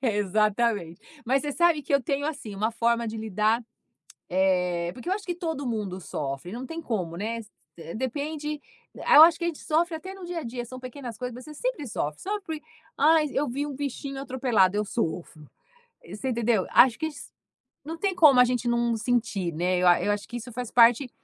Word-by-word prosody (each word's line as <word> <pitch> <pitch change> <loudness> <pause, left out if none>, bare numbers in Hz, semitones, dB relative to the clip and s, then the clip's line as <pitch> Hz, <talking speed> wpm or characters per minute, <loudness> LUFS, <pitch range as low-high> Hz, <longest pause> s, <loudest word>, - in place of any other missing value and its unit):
Exatamente, 210 -4 +1 0.2
mas 265 +3 +2
você 295 - -2
sabe 340 -1 +3
que - - -5
eu 280 - +5
tenho, 280 +3 -1
assim, 275 -9 -5
uma 215 +3 0
forma 235 0 +1
de 220 - -5
lidar, 220 +2 0 0.7
eh, 180 -2 +1
porque 250 - -8
eu - - +1
acho 405 +1 -2
que 350 - -2
todo 320 -5 -4
mundo 210 -6 -3
sofre. 140 -1 -5
Não 245 +3 -5
tem 330 +4 -6
como, 185 - -3
né, 225 +5 -3 0.6
depende 295 +4 -3 0.3
eu 300 - +7
acho 330 -1 +5
que 340 - -3
a - - +2
gente 330 - -5
sofre 325 +2 0
até 375 +4 -8
no 385 -2 -10
dia 350 -1 -4
a - - -8
dia. 240 +1 -5
São 255 +2 -9
pequenas 255 -2 -8
coisas 250 -1 -5
mas 250 +1 -10
você 305 - -10
sempre 335 - -3
sofre, 150 - -3
só 415 +2 -3
porque 320 -5 -6 0.4
ah, 315 +2 +5
eu 285 +2 0
vi 275 +4 -2
um 290 - -6
bichinho 275 0 -4
atropelado, 245 -8 +2
eu 210 - +1
sofro. 165 - -4 0.6
Você 210 +8 -5
entendeu, 230 -4 +1
acho 240 -2 +6
que 315 - -1
a - - -3
gen 290 - -12 0.7
não 320 +3 -5
tem 385 +3 -1
como 305 -7 +6
a 250 - +9
gente 245 0 -1
não 235 0 +1
sentir, 220 -6 0
né, 180 +3 +1
eu 180 0 +4
a 175 - +5
eu 205 - +2
acho 205 0 -4
que 240 - -6
isso 240 +1 -7
faz 245 0 -5
parte 240 +2 +5
245 Hz, 210 wpm, -26 LUFS, 210-295 Hz, 0.7 s, a